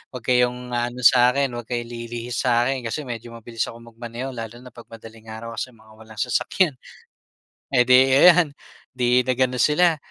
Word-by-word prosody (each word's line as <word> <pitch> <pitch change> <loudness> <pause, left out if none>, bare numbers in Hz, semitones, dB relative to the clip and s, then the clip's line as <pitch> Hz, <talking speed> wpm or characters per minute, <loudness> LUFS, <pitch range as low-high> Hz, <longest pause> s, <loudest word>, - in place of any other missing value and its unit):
'Wag 125 - -7
kayong 125 0 +1
aano 120 +1 -3
sa'kin, 125 +2 +4
'wag 120 -1 -7
kayo 120 -1 -3
lilihis 120 +1 -6
sa'kin 125 +1 +1
kasi 150 +7 -4
medyo 120 -2 -8
mabilis 115 0 -4
akong 115 0 -11
magmaneho 120 +3 -7
lalo 115 -1 -7
na 125 - -13
'pag 120 - -14
madaling 115 0 -14
araw 110 +1 -8
kasi 130 - -5
mga 110 -1 -21
walang 110 -1 -13
sasakyan. 145 - 0 1.0
Edi 130 +1 +5
ayan, 175 -4 +6 0.4
'di 125 0 +2
nag-ano 130 0 0
sila. 160 +6 +3
125 Hz, 160 wpm, -22 LUFS, 115-130 Hz, 1.0 s, ayan